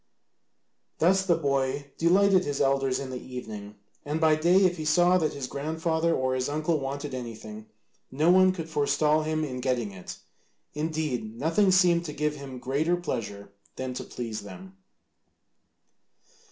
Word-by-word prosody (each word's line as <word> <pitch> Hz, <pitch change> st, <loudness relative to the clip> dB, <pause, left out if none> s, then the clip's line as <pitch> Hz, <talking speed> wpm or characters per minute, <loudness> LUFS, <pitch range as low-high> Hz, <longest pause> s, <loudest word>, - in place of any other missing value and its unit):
Thus 190 Hz, +3 st, +3 dB
the 170 Hz, -, +4 dB
boy 140 Hz, -2 st, -1 dB
delighted 185 Hz, +2 st, +4 dB
his 145 Hz, -3 st, -3 dB
elders 135 Hz, -1 st, +2 dB
in 135 Hz, -1 st, -5 dB
the 125 Hz, -, -5 dB
evening, 110 Hz, -5 st, -8 dB, 0.3 s
and 150 Hz, +2 st, -2 dB
by 160 Hz, -1 st, +4 dB
day 175 Hz, +5 st, +4 dB
if 180 Hz, -1 st, +1 dB
he 155 Hz, -, -4 dB
saw 175 Hz, +4 st, +4 dB
that 155 Hz, -2 st, 0 dB
his 140 Hz, -2 st, -4 dB
grandfather 160 Hz, +4 st, -1 dB
or 130 Hz, 0 st, 0 dB
his 130 Hz, +1 st, -1 dB
uncle 155 Hz, +2 st, 0 dB
wanted 140 Hz, +1 st, -5 dB
anything, 110 Hz, -3 st, -7 dB, 0.4 s
no 155 Hz, +6 st, +3 dB
one 185 Hz, 0 st, +6 dB
could 165 Hz, -3 st, -6 dB
forestall 150 Hz, 0 st, +2 dB
him 155 Hz, 0 st, -1 dB
in 130 Hz, -4 st, -4 dB
getting 125 Hz, -5 st, -1 dB
it; 95 Hz, -2 st, -9 dB, 0.6 s
indeed 150 Hz, -8 st, -3 dB
nothing 165 Hz, -, +2 dB
seemed 175 Hz, -2 st, +4 dB
to 150 Hz, -, -5 dB
give 150 Hz, +1 st, -1 dB
him 140 Hz, -3 st, -8 dB
greater 145 Hz, +8 st, 0 dB
pleasure 100 Hz, -, -5 dB, 0.2 s
than 130 Hz, -1 st, -4 dB
to 125 Hz, -, -5 dB
please 115 Hz, -3 st, -6 dB
them. 145 Hz, -, -11 dB
150 Hz, 155 wpm, -27 LUFS, 130-165 Hz, 0.6 s, one